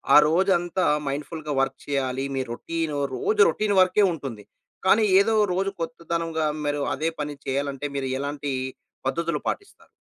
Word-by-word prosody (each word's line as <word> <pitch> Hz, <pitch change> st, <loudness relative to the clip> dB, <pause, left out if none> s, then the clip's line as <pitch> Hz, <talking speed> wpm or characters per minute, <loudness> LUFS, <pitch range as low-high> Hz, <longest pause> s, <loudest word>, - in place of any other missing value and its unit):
ఆ -, -, +11 dB
రోజంతా 175 Hz, 0 st, +2 dB, 0.2 s
మైండ్‌ఫుల్‌గా 150 Hz, +2 st, -4 dB
వర్క్ 135 Hz, 0 st, -1 dB
చెయ్యాలీ. 135 Hz, -2 st, -1 dB
మీ 135 Hz, -, 0 dB
రొటీను 160 Hz, +3 st, -3 dB, 0.2 s
రోజు 425 Hz, +1 st, +1 dB
రొటీన్ 210 Hz, -1 st, 0 dB
వర్కే 185 Hz, +3 st, +4 dB
ఉంటుంది, 125 Hz, -9 st, -7 dB, 0.4 s
కానీ 215 Hz, +3 st, +6 dB, 0.2 s
ఏదో 220 Hz, +3 st, +3 dB
ఓ -, -, +4 dB
రోజు 195 Hz, +2 st, 0 dB
కొత్తదనంగా 165 Hz, -1 st, -2 dB, 0.2 s
మీరు 145 Hz, 0 st, 0 dB
అదే 160 Hz, +4 st, 0 dB
పని 145 Hz, 0 st, -4 dB
చెయ్యాలంటే, 140 Hz, +1 st, -2 dB
మీరు 135 Hz, -1 st, -2 dB
ఎలాంటీ 145 Hz, 0 st, -3 dB, 0.5 s
పద్ధతులు 165 Hz, +3 st, -1 dB
పాటిస్తారు? 400 Hz, -, -5 dB
155 Hz, 145 wpm, -25 LUFS, 140-175 Hz, 0.5 s, ఆ